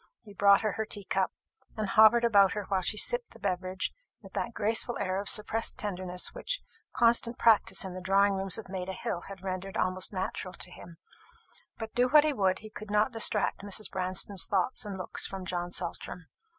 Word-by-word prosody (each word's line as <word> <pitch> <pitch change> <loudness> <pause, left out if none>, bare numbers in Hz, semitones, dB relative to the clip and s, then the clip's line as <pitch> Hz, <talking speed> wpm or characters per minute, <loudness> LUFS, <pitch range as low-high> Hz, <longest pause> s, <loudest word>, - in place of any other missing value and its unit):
He 205 - -13
brought 200 0 +5
her 215 - 0
her 220 - -3
tea 205 -3 0
cup, 190 0 0 0.5
and 215 -1 -1
hovered 220 +3 +6
about 200 -5 +5
her 210 - -3
while 190 -2 +1
she 210 +4 0
sipped 485 - +1
the - - -15
beverage 185 +1 -2 0.3
with - - -14
that - - -2
graceful 225 +3 0
air 185 -1 -1
of 200 - 0
suppressed 220 +1 +1
tenderness 185 -3 -3
which - - -3 0.3
constant 235 0 +2
practice 205 -6 +3
in 185 - -6
the 185 - -7
drawing 195 +2 +3
rooms 195 +1 0
of 225 - -8
Maida 190 0 -5
hill 175 -1 -4
had 195 -1 -10
rendered 190 0 -4
almost 185 0 -1
natural 185 -1 -4
to 180 - -3
him; 170 -1 -13 0.8
but, 225 -1 -7
do 245 +1 +2
what 300 +2 +7
he 305 -1 +1
would, 190 -5 +1
he 215 - -10
could 215 -1 -9
not 210 +4 +2
distract 225 -4 +1
Mrs. 205 +1 -3
Branston's 185 +1 -1
thoughts 205 +5 0
and 200 -2 -5
looks 185 - -1
from 190 -1 -7
John 175 -1 -3
Saltram. 175 0 -5
200 Hz, 200 wpm, -29 LUFS, 185-220 Hz, 0.8 s, what